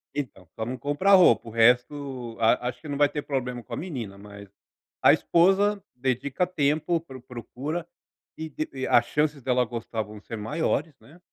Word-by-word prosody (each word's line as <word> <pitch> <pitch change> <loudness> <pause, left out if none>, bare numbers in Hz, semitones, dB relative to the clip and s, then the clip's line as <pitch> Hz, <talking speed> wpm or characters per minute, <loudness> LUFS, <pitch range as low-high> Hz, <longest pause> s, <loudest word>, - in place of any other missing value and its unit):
então, 125 -11 -5
só 110 - -3
não 125 +2 -4
comprar 145 +10 +2
roupa, 185 -10 +6
o - - -7
resto 125 +1 +1
a 120 +2 +3
acho 125 - -9
que 155 - -10
não 145 - -3
vai 145 0 +5
ter 150 +1 -3
problema 125 -4 -3
com 120 - -10
a - - -3
menina, 120 - -6
mas 100 -1 -12 0.5
a - - +7
esposa 195 +3 +3
dedica 130 +6 -1
tempo, 155 0 +1
pro 135 -6 -12
procura 130 +6 -6 0.5
e 160 0 -5
de 155 +2 -4
e 130 -1 -3
as 120 0 +5
chances 150 0 0
dela 125 -1 +2
gostar 115 -1 -4
vão 105 0 -9
ser 115 +2 -8
maiores, 150 +5 -1
né 160 +6 -18
130 Hz, 185 wpm, -26 LUFS, 120-155 Hz, 0.5 s, a